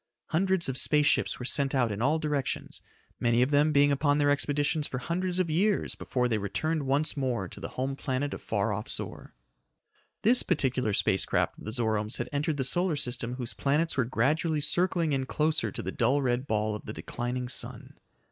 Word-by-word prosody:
Hundreds 190 +1 +1
of 130 -1 0
space 150 +2 +3
ships - - +2
were 125 - -6
sent 140 +1 +2
out 125 -4 +2
in 105 +1 -4
all 150 +6 +3
directions, 150 -3 -3 0.4
many 120 +1 +3
of 130 - -1
them 150 +2 +4
being 145 0 +4
upon 145 +1 +2
their 145 -1 +3
expeditions 145 +1 +1
for 125 - -4
hundreds 175 +7 -2
of 185 -2 +1
years 190 +6 +1
before 125 -1 -1
they 110 -3 0
returned 150 - -2
once 145 +4 +1
more 125 -9 -1
to - - -11
the - - -5
home 135 +1 -1
planet 140 +1 -2
of - - -7
far 105 0 -1
off 105 +2 -5
Zor. - - -5 0.9
This 245 +4 +5
particular 125 -6 0
space 95 -1 +2
craft - - -1
of - - -11
the 110 - -4
Zoromes 110 -2 0
had 120 +1 -4
entered 145 +1 -1
the 135 - 0
solar 175 +5 +1
system 125 -3 -1
whose 125 -2 -4
planets 150 +4 0
were 130 - +2
gradually 150 +7 +1
circling 170 0 +1
in 135 -1 -1
closer 155 +2 0
to - - -5
the - - -3
dull 135 +1 +2
red 125 +1 0
ball 110 0 0
of 105 - -8
the 110 - -5
declining 125 +2 -4
sun. 125 - -4
140 Hz, 205 wpm, -28 LUFS, 120-155 Hz, 0.9 s, This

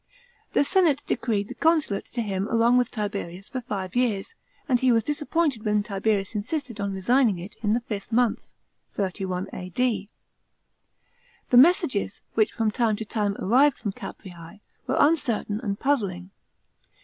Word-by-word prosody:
The - - +4
senate 295 -2 +2
decreed 205 -4 -1
the - - -7
consulate 315 -11 +1
to 235 - -3
him 195 -1 -2
along 230 +2 +3
with 245 -1 0
Tiberius 200 -3 -5
for 255 - -4
five 195 -4 -5
years, 240 - 0 0.3
and 250 -4 +3
he 255 0 +3
was 225 -2 +3
disappointed 295 -2 -1
when 210 -1 +1
Tiberius 200 0 -1
insisted 235 +1 -4
on 200 0 -1
resigning 230 +1 +3
it 180 +4 -9
in 210 -1 +1
the 240 - +1
fifth 210 -2 -6
month 240 0 0 0.4
(31 185 -1 -3
A.D.). 200 +2 -2 1.4
The 245 - +6
messages, 265 - +4
wh'ch 215 -1 +3
from 225 -2 -1
time 225 -1 +1
to 220 - -5
time 205 -2 -1
arrived 265 +7 +3
from 205 - -3
Caprea3, 180 +1 -10 0.3
were - - 0
uncertain 240 -9 +2
and 200 -5 -3
puzzling. 195 -10 -1
215 Hz, 150 wpm, -25 LUFS, 200-250 Hz, 1.4 s, The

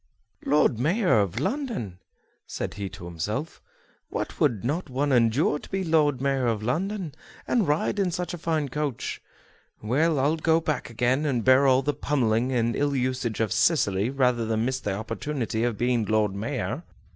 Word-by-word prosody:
"Lord 145 -5 +3
Mayor 170 - +3
of 100 +2 0
London!" 195 - -3 0.5
said - - -4
he 100 -1 -5
to 90 - -10
himself, 105 - -4 0.5
"what - - -4
would 120 - +2
not 150 +5 -2
one 140 +3 0
endure 125 +4 +3
to - - -13
be 195 0 -1
Lord 155 -5 +2
Mayor 135 -2 +1
of 110 -2 -1
London, 175 - -2 0.3
and 230 -6 +2
ride 150 +7 0
in 195 -2 +2
such 175 0 -3
a 175 - -6
fine 155 -3 -1
coach? 145 -2 -3 0.6
Well, 145 +8 +1
I'll 145 +4 +2
go 160 0 +3
back 155 -5 -2
again, 125 +5 +1
and 125 -7 0
bear 130 +2 +6
all 130 0 +4
the 145 - 0
pummelling 125 -4 0
and 115 -2 +1
ill 145 0 0
usage 125 -3 -1
of 110 -2 0
Cicely 110 - +2
rather 125 -3 +1
than 110 0 0
miss 130 +1 -1
the 100 -5 -2
opportunity 115 +2 -3
of 120 -3 0
being 120 -1 +1
Lord 105 -1 +1
Mayor!" 115 - -3
130 Hz, 175 wpm, -26 LUFS, 115-150 Hz, 0.6 s, bear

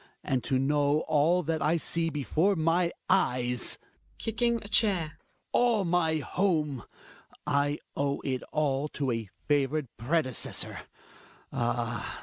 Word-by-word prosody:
And 130 -3 0
to 130 - +1
know 145 +2 +2
all 160 +4 +2
that 160 0 -1
I 160 +3 +3
see 165 0 -1
before 160 +6 +1
my 170 +1 +2 0.2
eyes 125 -10 +1 0.4
(Kicking 235 +1 0
a - - -8
chair.) 195 -8 +2 0.2
— - - -46
All 235 -5 +3
my 170 -2 +2
home 155 -4 0 0.3
— - - -29 0.2
I 145 0 +1 0.2
owe 140 0 0
it 130 -2 -2
all 145 -1 +1
to 140 -3 0
a 115 -3 -3 0.2
favored 145 -2 +1
predecessor. 130 0 -1 0.7
Ah! 120 -2 -2
150 Hz, 130 wpm, -29 LUFS, 135-170 Hz, 0.7 s, I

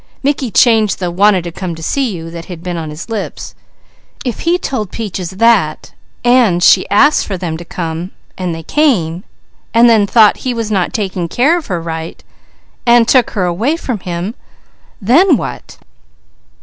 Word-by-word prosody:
Mickey 275 -2 0
changed 220 -1 +3
the 180 -2 -3
"wanted 190 0 +3
to 170 - -6
come 175 0 -5
to 165 - -10
see 270 - 0
you" 165 -4 -7
that 170 0 -8
had 170 -3 -9
been 180 -1 -4
on 160 -2 -5
his 150 +3 -8
lips. 225 -3 -5 0.7
If 245 - -3
he 340 +2 +1
told 255 - -3
Peaches 190 -6 -5
that, 195 -5 +1 0.3
and 235 -8 +3
she - - +5
asked 290 +9 +3
for 195 - -3
them 170 -3 -4
to 170 - -9
come, 165 +1 -5 0.3
and 180 -3 -3
they 165 - -8
came, 185 - 0 0.5
and 235 +1 +6
then 220 -3 +4
thought 215 -1 +5
he 255 -2 -3
was 225 -2 -3
not 190 -4 0
taking 190 -5 -3
care 270 - +2
of 340 -4 -4
her 180 -4 -2
right, 165 0 -6 0.6
and 235 -1 +4
took 250 -3 +4
her 185 - +1
away 220 - 0
from 250 -9 -4
him 180 +3 -4 0.7
then 280 - +4
what? - - -7
200 Hz, 175 wpm, -14 LUFS, 175-240 Hz, 0.7 s, and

